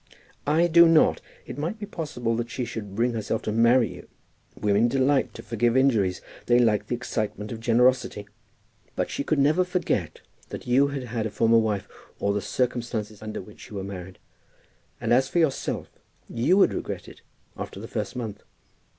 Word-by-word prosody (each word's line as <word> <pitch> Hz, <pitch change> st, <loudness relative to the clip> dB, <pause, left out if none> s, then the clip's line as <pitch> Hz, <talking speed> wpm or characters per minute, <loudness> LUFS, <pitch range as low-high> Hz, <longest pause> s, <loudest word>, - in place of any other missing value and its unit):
"I 160 Hz, +4 st, +4 dB
do 170 Hz, 0 st, +7 dB
not. 165 Hz, -1 st, +4 dB, 0.2 s
It 140 Hz, -, -7 dB
might 165 Hz, +9 st, -2 dB
be 210 Hz, -, -6 dB
possible 145 Hz, -, -3 dB
that 120 Hz, 0 st, -3 dB
she 125 Hz, 0 st, -3 dB
should 105 Hz, -4 st, -7 dB
bring 120 Hz, +2 st, +1 dB
herself 110 Hz, 0 st, -2 dB
to -, -, -2 dB
marry 115 Hz, 0 st, +4 dB
you. -, -, -12 dB, 0.5 s
Women 105 Hz, +3 st, +3 dB
delight 135 Hz, +2 st, +2 dB
to -, -, -9 dB
forgive 120 Hz, +2 st, +1 dB
injuries. 110 Hz, -9 st, +2 dB, 0.3 s
They 120 Hz, -, +5 dB
like 110 Hz, -4 st, +2 dB
the -, -, -1 dB
excitement 110 Hz, -3 st, -4 dB
of 115 Hz, -, -5 dB
generosity. 120 Hz, -2 st, +2 dB, 0.7 s
But -, -, -1 dB
she -, -, -2 dB
could 155 Hz, -, 0 dB
never 150 Hz, +6 st, +4 dB
forget 180 Hz, -, -2 dB, 0.3 s
that -, -, -7 dB
you 130 Hz, +3 st, +4 dB
had 140 Hz, -2 st, -4 dB
had 115 Hz, -2 st, -2 dB
a -, -, -6 dB
former 115 Hz, +2 st, +3 dB
wife, 105 Hz, -3 st, -1 dB, 0.3 s
or 100 Hz, 0 st, 0 dB
the 105 Hz, -, -1 dB
circumstances 115 Hz, -4 st, -2 dB
under 110 Hz, -3 st, -5 dB
which 105 Hz, +2 st, -14 dB
you 105 Hz, -, -9 dB
were 95 Hz, -, -3 dB
married. 95 Hz, -2 st, -8 dB, 0.8 s
And -, -, +1 dB
as 130 Hz, +2 st, +4 dB
for -, -, -2 dB
yourself, 160 Hz, -5 st, 0 dB, 0.4 s
you 135 Hz, +11 st, +2 dB
would 200 Hz, -, +5 dB
regret -, -, -5 dB
it -, -, -13 dB, 0.3 s
after -, -, -7 dB
the 110 Hz, -, -7 dB
first 105 Hz, -2 st, -4 dB
month. 115 Hz, -5 st, -5 dB
120 Hz, 185 wpm, -25 LUFS, 105-135 Hz, 0.8 s, do